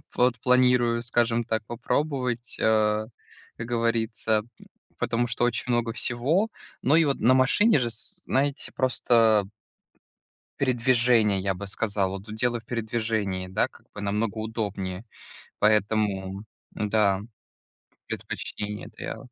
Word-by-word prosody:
вот 125 -1 +2
планирую, 125 -2 +3
скажем 120 0 +1
так, 110 0 -2
попробовать, 125 0 -2
а, 110 -1 +2 0.5
как 115 - -6
говорится, 115 -2 0 0.2
м, - - -16 0.3
потому 120 +1 0
что 120 - -2
очень 120 +1 0
много 115 -1 0
всего. 150 - +1 0.3
Но 145 +5 +3
и 165 - +6
вот 140 - 0
на 125 +4 +5
машине 145 - +4
же, 120 -2 0
с 110 -1 -4
знаете, 140 +1 0
просто 115 -5 +3 1.1
Передвижение, 120 -5 +3
я 95 0 0
бы 100 +2 -6
сказал. 100 -2 -1
Вот 100 +3 -7
дело 120 +1 0
в 110 - -22
передвижении, 110 -5 -2
да, 95 - 0
как - - -21
бы 105 - -7
намного 105 +2 -1
удобнее. 100 -4 -4 0.6
Поэтому, 105 -2 +1 0.3
да, 105 -2 +1 0.9
предпочтение- 105 0 -5
это - - -11
я - - -4
115 Hz, 125 wpm, -26 LUFS, 105-125 Hz, 1.1 s, и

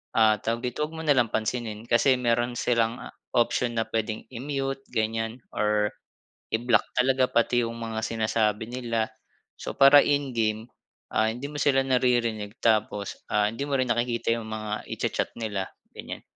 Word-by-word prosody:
ah, 110 -1 +5
tawag 115 +2 -2
dito 150 - -1
'wag 160 - -12
mo 160 - -5
na 145 - +4
lang 120 -2 +4
pansinin 110 -1 -2
kasi 130 +3 +4
meron 120 0 +1
silang 115 0 +1
a - - -8 0.3
option 120 0 +2
na 115 - +2
pwedeng 110 -1 -2
i-mute 135 +1 -3
ganyan 115 +1 -1
or 105 0 +2 0.6
i-block 115 -1 +3
talaga, 130 +1 +4
pati 120 +1 +2
'yung 115 - -4
mga 115 -1 -4
sinasabi 110 -1 0
nila. 115 -3 -1 0.5
So, - - -5
para 140 +1 +8
in-game, 115 -6 0 0.4
ah, 110 0 +3
hindi 125 +4 -6
mo 150 - -6
sila 135 -2 +4
naririnig 120 -5 +1
tapos, 105 -2 +1
ah, 105 0 +3
hindi 140 +5 -4
mo 140 - -3
rin 130 -2 0
nakikita 120 -1 0
'yung 115 - -6
mga 110 -1 -4
icha-chat - - -2
nila, 100 -4 -2 0.3
ganyan. - - -7
115 Hz, 160 wpm, -26 LUFS, 110-125 Hz, 0.6 s, para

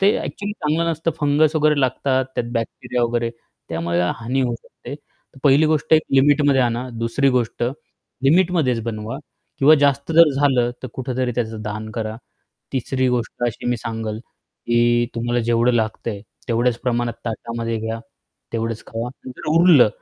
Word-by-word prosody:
ते 200 +2 +4
ॲक्चुअली 205 0 -4
चांगलं 165 -2 0
नसतं 165 +1 -1
फंगस 150 +2 +3
वगैरे 150 -1 +3
लागतात 130 +1 +1
त्यात 120 - -2
बॅक्टेरिया 120 +1 -2
वगैरे, 120 0 0 0.4
त्यामुळे 85 +1 -1
हानी 120 +4 -2
होऊ 125 -2 0
शकते. 115 - -10
तर 145 -2 -21
पहिली 145 +3 +5
गोष्ट 155 -1 0
एक 155 0 +6
लिमिटमध्ये 140 0 +4
आणा. 120 +1 0
दुसरी 115 +4 +1
गोष्ट 120 -2 -1 0.6
लिमिटमध्येच 160 -5 +3
बनवा 110 +2 -4 0.4
किंवा 150 +2 +7
जास्त 140 +1 +1
जर 165 -1 +7
झालं, 130 -4 +3
तर 130 - -5
कुठेतरी 130 -1 -2
त्याचं 110 -2 -3
दान 110 +1 -5
करा. 110 0 -4 0.6
तिसरी 130 0 0
गोष्ट 120 0 -2
अशी 120 - -4
मी 120 0 +1
सांगेल 110 -1 -4
की 120 0 -1
तुम्हाला 120 +1 0
जेवढं 120 +1 +2
लागतंय, 110 -2 -2 0.3
तेवढ्याच 120 +1 +2
प्रमाणात 120 -1 0
ताटामध्ये 115 0 -3
घ्या, 110 +1 -3 0.5
तेवढेच 115 -1 -3
खावा. 115 +2 -4 0.2
नंतर 130 +5 -7
उरलं, 165 -8 +7
125 Hz, 150 wpm, -21 LUFS, 115-140 Hz, 0.6 s, किंवा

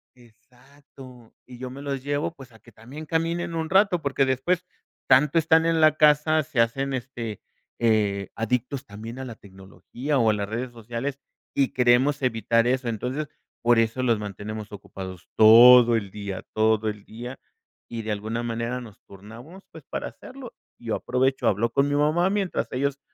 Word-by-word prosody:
Exacto, 125 +1 -18
y 125 -1 -12
yo 130 - -6
me 135 +2 -9
los 140 -2 -4
llevo, 145 +3 -2
pues, 135 -5 -14
a 110 - -18
que 120 - -19
también 130 +9 -11
caminen 165 +2 -2
un 160 -1 -3
rato, 190 -3 +3
porque 140 -1 +1
después, 165 +8 0 0.4
tanto 140 +5 +4
están 160 0 +4
en 165 -1 +2
la 155 -1 +5
casa, 150 +1 +4
se 125 - -4
hacen, 135 +4 +1
este, 120 -4 -5 0.4
eh, 105 -4 +1
adictos 125 +4 -2
también 115 +4 -9
a 130 - -5
la 120 -3 -8
tecnología 100 +9 -6
o 115 -3 +3
a - - +3
las 100 -1 -3
redes 120 +2 -4
sociales, 120 +4 -5 0.3
y 135 -2 +2
queremos 130 +4 +3
evitar 115 -1 +1
eso. 130 -1 0
Entonces, 125 +7 -3 0.3
por 120 -1 +4
eso 115 +3 0
los 115 -3 +2
mantenemos 105 +1 -7
ocupados 95 -3 -9
todo 120 +2 +8
el 100 -3 -2
día 100 -2 -6
todo 110 0 +2
el 105 -1 -8
día. 120 +4 -9 0.5
Y, 115 -1 -5
de 110 0 -4
alguna 110 +3 -3
manera, 120 +2 -3
nos 110 -4 -13
turnamos, 115 - -13
pues, - - -12
para - - -4
hacerlo. 260 -2 -12 0.3
Yo 115 -2 -3
aprovecho, 130 +1 0
hablo 110 +4 +1
con 140 +1 +2
mi 145 - -1
mamá, 155 +5 +2
mientras 195 -2 -1
ellos 140 +2 -2
125 Hz, 175 wpm, -24 LUFS, 110-140 Hz, 0.5 s, todo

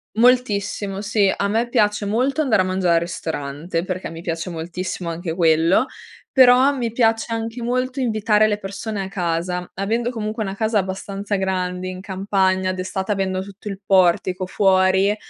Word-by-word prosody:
Moltissimo 210 -5 +2
sì, 205 -1 +2
a 200 - -1
me 225 +4 0
piace 210 -2 +1
molto 255 +9 +1
andare 230 -10 +3
a - - -3
mangiare 185 -2 +1
al - - +5
ristorante 165 0 -4
perché 185 0 -4
mi 165 0 -9
piace 165 +1 -4
moltissimo 175 +2 -5
anche 165 0 -4
quello, 165 +5 +3 0.5
però 260 +1 +6
mi 240 -4 -2
piace 225 -1 +1
anche 225 +1 -3
molto 255 +2 -1
invitare 215 -2 +2
le 205 - 0
persone 200 +1 -5
a - - -5
casa, 180 -1 -2
avendo 225 +5 -1
comunque 220 -2 -3
una 195 -2 -4
casa 220 +1 +1
abbastanza 195 +2 -3
grande 185 -1 -2
in 185 0 -6
campagna, 190 -1 0
d'estate 190 +2 -2
avendo 190 -1 -1
tutto 200 +2 -9
il 195 -1 -6
portico 185 -1 +3
fuori, 190 +1 +3
195 Hz, 160 wpm, -21 LUFS, 185-220 Hz, 0.5 s, però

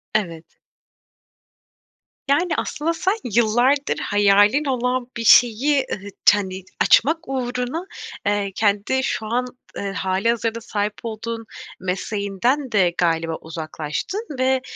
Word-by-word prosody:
Evet. 170 -6 -3 1.7
Yani, 325 +6 +2
aslında 325 +3 -1
sen, 380 +4 0 0.2
yıllardır 240 +5 +2
hayalin 205 +7 +3
olan 250 -2 -1
bir 230 - -3
şeyi, 250 +6 +5
ııı, 200 +1 -6 0.2
t 205 - +7
hani, 190 -2 -5 0.2
açmak 315 +7 +5
uğruna, 255 +5 -3 0.4
eee, 205 -1 0
kendi 210 +5 +1
şu 220 - -2
an, 245 +3 0 0.3
eee, 200 -1 -3
hâlihazırda 225 +4 -1
sahip 210 -2 -2
olduğun 225 0 -5 0.3
mesleğinden 200 +8 -1
de 185 -5 +3
galiba 165 -1 +1
uzaklaştın 160 - -5
ve, 260 0 +2
225 Hz, 110 wpm, -22 LUFS, 200-260 Hz, 1.7 s, t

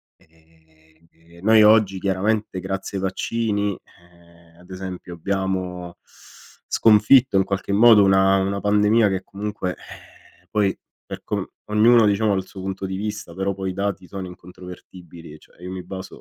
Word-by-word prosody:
Ehm, 80 +1 -26
noi 110 0 +6
oggi 105 -3 +4
chiaramente 100 +1 -1
grazie 95 +1 -5
ai - - -6
vaccini, 105 +1 -2
ehm, 85 -1 -23
ad 90 - -20
esempio 95 -1 -7
abbiamo 90 -1 -3 0.7
sconfitto 115 +2 +4
in 95 - +4
qualche 100 +1 -3
modo 110 0 +7
una 95 0 +4
una 100 +1 -1
pandemia 105 +1 +3
che 95 -1 -3
comunque 100 -2 -5
ehm, 90 0 -16
poi 100 -2 0 0.3
per - - -8
com - - -2 0.3
ognuno 115 +2 +5
diciamo 105 +1 +1
ha - - +1
il 95 -1 -3
suo 95 - -10
punto 95 0 -5
di 95 - -5
vista, 105 -3 -5
però 95 +1 -2
poi 95 -1 -4
i - - -8
dati 100 -1 -3
sono 95 0 -7
incontrovertibili, 90 -2 -13
cioè - - -23
io 90 +1 -7
mi 95 -1 -6
baso 95 -1 -9
95 Hz, 155 wpm, -22 LUFS, 90-105 Hz, 0.7 s, modo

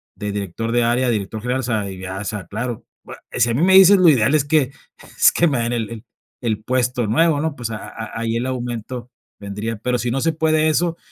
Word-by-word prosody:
de 105 +1 -4
director 105 +3 -4
de 120 0 +2
área 120 +2 +1
a - - +2
director 105 0 -3
general, 125 +2 -1
o - - -3
sea, 110 -4 -1
ya 95 +1 -6
sa 105 -2 -5
claro. 115 +2 -4 0.2
Bue - - -10 0.2
y - - -5
si 120 - +3
a - - 0
mí 135 - 0
me 190 +1 +4
dicen, 190 0 +8
lo 170 - +7
ideal 130 0 +3
es 145 - +3
que 145 -3 +2 0.5
es - - +6
que 170 - +2
me 135 -5 0
dan 115 +1 -1
el 115 -2 -2
el 115 -1 -8 0.4
el 110 -3 -2
puesto 125 -1 0
nuevo, 155 +6 +3
¿no? 155 -1 -2
Pues, 120 -2 -5
a 105 - -4
a - - -9
a 115 0 -7
ahí 115 0 -1
el 120 +2 -1
aumento 120 -1 -5 0.3
vendría, 105 +2 -5
pero 125 +3 -1
si 120 - -2
no 135 +1 -1
se 165 0 +1
puede 155 0 +2
eso, 170 +2 0
120 Hz, 255 wpm, -20 LUFS, 110-140 Hz, 0.5 s, dicen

